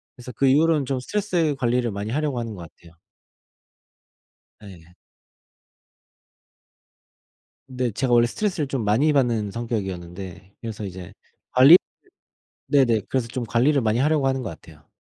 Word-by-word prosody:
그래서 125 0 -10
그 135 +4 +1
이후로는 150 +1 +3
좀 135 -1 -2
스트레스 175 -3 -1
관리를 120 -1 0
많이 100 +2 -5
하려고 145 -2 -1
하는 115 -2 -5
것 90 - -10
같아요. 85 -1 -20 1.7
네. 90 -4 -14 2.7
네. 125 -3 -2
제가 125 +4 -2
원래 120 0 +5
스트레스를 175 - -2
좀 130 -4 -3
많이 125 +9 +2
받는 115 -7 +1
성격이었는데 95 -5 -6
그래서 110 -2 -6
이제 90 -2 -9 0.4
관리를 135 +7 +8 0.9
네네 120 -6 +3
그래서 130 -3 -1
좀 120 +1 -4
관리를 125 +6 +2
많이 110 +1 0
하려고 150 -1 +2
하는 130 -1 -1
것 100 - -4
같아요. 80 -1 -14
120 Hz, 310 characters per minute, -23 LUFS, 105-135 Hz, 2.7 s, 관리를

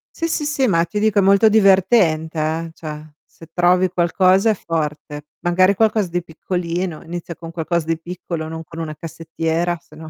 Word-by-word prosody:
Sì, 330 - -2
sì, 305 -2 -2
sì, 285 -3 +1
ma 170 -4 +3
ti 210 - -4
dico 215 -1 +2
è - - +5
molto 200 +3 +5
divertente, 190 -6 +3
eh. 160 +1 -2
Cioè, 155 -1 -9
se 165 - -16
trovi 180 +1 +3
qualcosa 185 +4 +3
è - - +4
forte. 150 -3 -4
Magari 185 +3 +3
qualcosa 215 -3 +2
di 175 0 -2
piccolino, 175 0 -4
inizia 170 0 -7
con 165 -1 -9
qualcosa 170 0 -2
di 165 0 -1
piccolo, 170 -2 -6
non 160 0 -6
con 165 0 -10
una 155 -2 -5
cassettiera, 165 +2 -3
se 155 - -19
no 160 0 -10
170 Hz, 185 wpm, -20 LUFS, 160-190 Hz, -, è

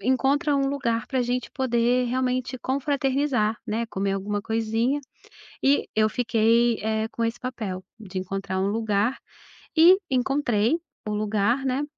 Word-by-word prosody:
encontra 275 - +2
um 275 -1 +1
lugar 235 -5 -1
pra 260 -3 0
gente 245 +1 -2
poder 245 -1 +1
realmente 255 +1 -1
confraternizar, 270 -4 0
né, 225 +2 -1
comer 200 -2 -2
alguma 205 +1 -2
coisinha." 225 +5 0 0.6
E 280 +1 +3
eu 215 0 +3
fiquei, 230 0 +2
eh, 220 0 0
com 230 - -3
esse 230 +1 -1
papel 215 -7 -5 0.2
de 190 -3 -8
encontrar 190 0 -3
um 190 - +1
lugar 215 +2 0 0.6
e 340 +4 +8
encontrei 250 -2 +1 0.3
o - - -1
lugar, 215 +5 +1
né, 265 +2 0
235 Hz, 140 wpm, -25 LUFS, 215-265 Hz, 0.6 s, e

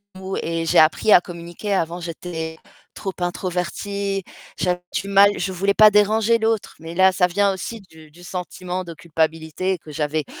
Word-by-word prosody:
maux 190 0 -5
et 165 0 -2
j'ai - - +4
appris 160 +7 +4
à 175 - +8
communiquer. 175 +4 -6
Avant 170 -1 -1
j'étais 160 -1 -6 0.4
trop 195 -2 -4
introvertie, 190 +2 -2 0.3
j'avais 180 -1 0
du 195 - -2
mal, 200 +1 +5
je 190 - -2
voulais 195 +2 0
pas 215 -1 +8
déranger 220 +2 +3
l'autre 220 -1 -1
mais 165 +1 -8
là 190 0 +6
ça 180 -1 +2
vient 200 +2 +2
aussi 225 +4 -6
du 160 -1 -16
du 175 +3 -16
sentiment 180 0 -5
de 170 -1 -8
culpabilité 160 +3 -1
que 155 -1 -13
j'avais 150 0 -2
180 Hz, 175 wpm, -22 LUFS, 165-200 Hz, 0.4 s, à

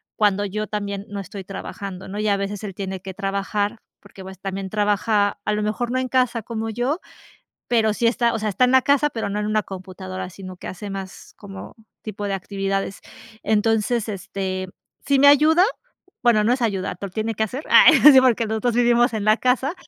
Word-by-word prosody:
cuando 205 -1 +2
yo 215 +2 -3
también 200 -1 -4
no 205 - -5
estoy 195 +1 -8
trabajando, 195 0 -7
¿no?, 195 +2 -6
y 210 0 -1
a 200 -1 +2
veces 200 +1 -4
él 200 -3 -5
tiene 190 -1 -5
que 190 0 -7
trabajar 200 +2 -2 0.2
porque 195 -1 -14
pues 190 -1 -10
también 195 0 -5
trabaja 205 0 +1
a - - +1
lo 210 - -1
mejor 220 +3 -2
no 255 - 0
en 260 - -2
casa 250 -3 +1
como 225 0 -4
yo. 245 - -1 0.7
Pero 220 -3 +2
sí 235 - -1
está, 235 0 +2
o - - 0
sea, 215 0 -1
está 250 +6 +3
en 250 - +1
la 260 -1 +5
casa, 285 +1 +3
pero 225 -4 -4
no 205 +1 -3
en 210 - -2
una 215 0 +1
computadora, 185 -1 -7
sino 185 0 -10
que 180 - -9
hace 195 +2 -7
más 195 -1 -8
como 195 -2 -10 0.3
tipo 210 -1 -5
de 200 - -2
actividades. 195 +1 -3 0.4
Entonces 220 +1 +1
este 190 -2 -4 0.4
sí 280 0 +2
me 275 - +5
ayuda, 310 +5 +6 0.6
bueno, 235 -3 +4
no 230 +3 +3
es 255 - -3
ayudar, 195 -5 -1
pero 200 - -4
lo - - -25
tiene 220 +1 -2
que 220 - -5
hacer. 255 +7 -4
Ah, - - +8 0.3
sí, 260 - +8
porque 235 -3 +3
los 220 0 -3
2 240 -2 0
vivimos 240 0 +3
en 215 -2 -2
la 215 +1 +4
casa. 260 +5 +1
210 Hz, 215 wpm, -22 LUFS, 195-235 Hz, 0.7 s, Ah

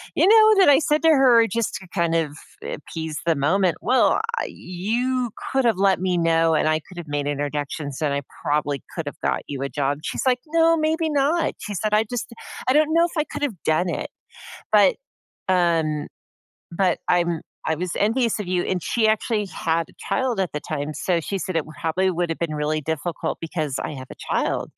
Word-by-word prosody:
you - - +4
know, 435 0 +7
then 380 -6 +6
I 280 - +7
said 305 0 +1
to 325 - +6
her 255 -6 +6
just 230 -1 -2
to 190 - -8
kind 170 -3 +1
of 155 -3 -1 0.3
appease 160 0 -5
the 165 - +4
moment, 170 +5 +2
"Well, 255 - +3 0.2
I - - -1
you 235 +8 -2 0.2
could 265 -1 +2
have 230 -5 +3
let 195 -2 +3
me 185 -1 +1
know, 165 -1 +3
and 155 - +2
I 155 0 +2
could 185 - -14
have 170 -2 -7
made 145 -1 -2
introductions, 145 0 -3
and 150 -2 +1
I 140 - -1 0.2
probably 145 -1 0
could 165 - -3
have 145 - -6
got - - 0
you 140 -2 -5
a 140 - -2
job." 145 0 -1
She's - - -3
like, 250 -1 +3
"No, 330 +1 +4
maybe 320 +1 0
not." 295 +4 +1
She 205 - -6
said, 210 +3 -1
"I 215 +1 +4
just 245 -2 -4
d 235 - -13 0.3
I 255 - +4
don't 305 +1 +3
know 335 +1 +5
if 345 - -4
I 305 - +3
could've 250 - -3
done 165 +3 +2
it. - - -3 0.6
But, - - +5 0.5
um, 165 -5 +1 0.7
but 185 +2 +1
I'm 170 -2 +1 0.2
I 160 - +1
was 180 +2 -3
envious 230 +2 +1
of 205 - -4
you," 180 -1 0
and 180 -2 -2
she 220 +4 +1
actually 215 -1 0
had 165 -3 -1
a - - -23
child 260 -4 0
at 185 - -1
the 150 - -3
time, 150 0 -4
so 175 +2 0
she 195 +5 -3
said, 185 -1 -3
"It 160 - +1
would 155 - -12
probably 185 +4 +1
would 175 -1 -1
have 165 - -3
been 165 -2 -2
really 150 +1 -1
difficult 160 +2 -3
because 155 -4 -3
I - - -4
have 130 -2 -9
a - - -9 0.2
child," - - -1
180 Hz, 215 wpm, -23 LUFS, 155-240 Hz, 0.7 s, know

